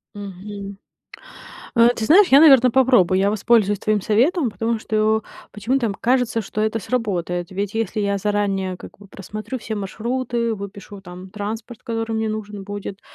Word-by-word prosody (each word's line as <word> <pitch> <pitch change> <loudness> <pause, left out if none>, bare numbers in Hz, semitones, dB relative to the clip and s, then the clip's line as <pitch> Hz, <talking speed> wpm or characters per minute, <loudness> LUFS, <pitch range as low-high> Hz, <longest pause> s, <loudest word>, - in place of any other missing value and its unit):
Мгм, 200 0 -8 1.0
э, 235 0 +7
ты 225 - -3
знаешь, 365 - +6
я, 275 +2 +7
наверно, 270 -5 +7
попробую. 235 -8 +4
Я 200 +1 +2
воспользуюсь 210 -1 +2
твоим 215 +1 0
советом, 250 - +2
потому 225 +2 -2
что 215 0 0 0.3
почему-то 230 +1 -1
кажется, 245 -2 +1
что 215 0 -5
это 220 +1 0
сработает. 180 -6 -2
Ведь 200 +2 -4
если 220 -1 -2
я 200 -1 0
заранее, 195 -2 -1
как - - -13
бы, 200 - -15
просмотрю 215 +6 -7
все 220 -1 -5
маршруты, 235 +3 -2
выпишу 200 0 -9
там 180 +1 -11
транспорт, 220 +3 -6
который 225 -1 -3
мне 220 0 -1
нужен 210 -2 -6
будет, 205 -1 -7
215 Hz, 155 wpm, -21 LUFS, 200-230 Hz, 1.0 s, э